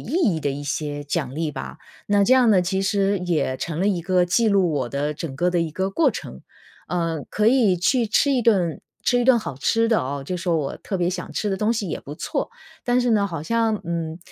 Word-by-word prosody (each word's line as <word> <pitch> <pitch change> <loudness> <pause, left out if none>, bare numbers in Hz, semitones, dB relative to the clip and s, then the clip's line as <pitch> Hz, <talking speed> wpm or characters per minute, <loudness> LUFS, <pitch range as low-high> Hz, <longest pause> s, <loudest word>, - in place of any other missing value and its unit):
意 - - -11 0.3
义 160 - -3
的 145 - -1
一 140 +1 -5
些 145 0 -3
奖 145 -3 -2
励 155 +1 -2
吧， - - -7 0.3
那 205 -1 +3
这 255 - +5
样 250 -3 +5
呢 195 -3 +5
其 190 +2 -1
实 200 0 +1
也 170 -7 -1
成 160 +3 -4
了 190 - +1
一 185 -4 0
个 180 0 +2
记 220 +6 +2
录 195 -4 +3
我 135 -5 -1
的 145 +3 -2
整 145 -3 -6
个 175 +5 +1
的 175 -1 +1
一 165 -1 -1
个 190 +5 -2
过 285 +7 +3
程。 65 - -8 0.5
呃， 165 -3 -1
可 210 - +1
以 225 -6 +4
去 230 +7 +2
吃 280 +7 +3
一 255 -3 +1
顿 185 -8 +2 0.2
吃 245 - +3
一 - - +1
顿 250 -1 +5
好 215 - -5
吃 225 +10 +1
的 225 -1 +2
哦， 135 +1 -4
就 180 - -2
说 170 -1 0
我 140 -3 -3
特 195 - -4
别 175 -1 +1
想 180 - -5
吃 210 - -2
的 195 - -1
东 215 +3 +1
西 215 -5 -3
也 - - -4
不 145 +2 -9
错， - - -3 0.3
但 245 0 +2
是 245 -1 +1
呢， 205 -3 +3
好 165 -6 -5
像， 225 +3 +1
嗯， 165 -1 -3
180 Hz, 265 characters per minute, -23 LUFS, 160-215 Hz, 0.5 s, 这